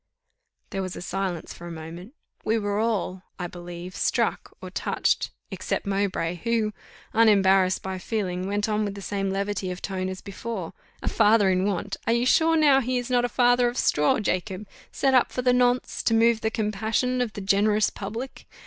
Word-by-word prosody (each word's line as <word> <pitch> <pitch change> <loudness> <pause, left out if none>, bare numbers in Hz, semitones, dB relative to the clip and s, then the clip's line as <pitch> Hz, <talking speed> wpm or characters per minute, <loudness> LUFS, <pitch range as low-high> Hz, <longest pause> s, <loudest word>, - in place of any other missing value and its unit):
There 195 - -2
was 185 -1 -4
a - - -7
silence 185 -2 -3
for 175 - -11
the 170 - -6
moment: 170 - -9 0.3
we 220 +1 +1
were 205 -1 -1
all, 205 -5 -1 0.2
I 180 - -4
believe, 175 +1 -8
struck, - - 0
or - - -8
touched, - - 0 0.2
except - - -3
Mowbray, 195 -4 -1
who, 220 +3 0 0.4
unembarrassed 195 -4 +4
by 190 -1 -4
feeling, 185 -3 -2
went 205 +1 0
on 215 0 0
with 200 -1 -3
the 200 - -8
same 195 -1 -2
levity 195 -1 -2
of 180 0 -5
tone 185 -2 -3
as 185 0 -6
before: 200 -2 -6 0.3
"A - - -4
father 205 -2 +4
in 185 +1 +1
want! 200 0 -2
Are 230 - +4
you 235 +1 +1
sure 325 +4 +4
now 290 -4 +5
he 255 0 -1
is 245 +1 -3
not 245 -1 +3
a - - -2
father 245 0 +4
of 240 +1 -3
straw, 150 0 +3
Jacob, 190 0 -2 0.3
set 270 -1 +1
up 255 - +4
for 250 - -3
the 250 0 +4
nonce, 250 0 +1
to 225 - +2
move 225 0 +4
the 220 - +1
compassion 220 +4 0
of 235 -4 -2
the 205 - -6
generous 205 +2 +2
public? 225 +6 -7
205 Hz, 195 wpm, -25 LUFS, 185-230 Hz, 0.4 s, now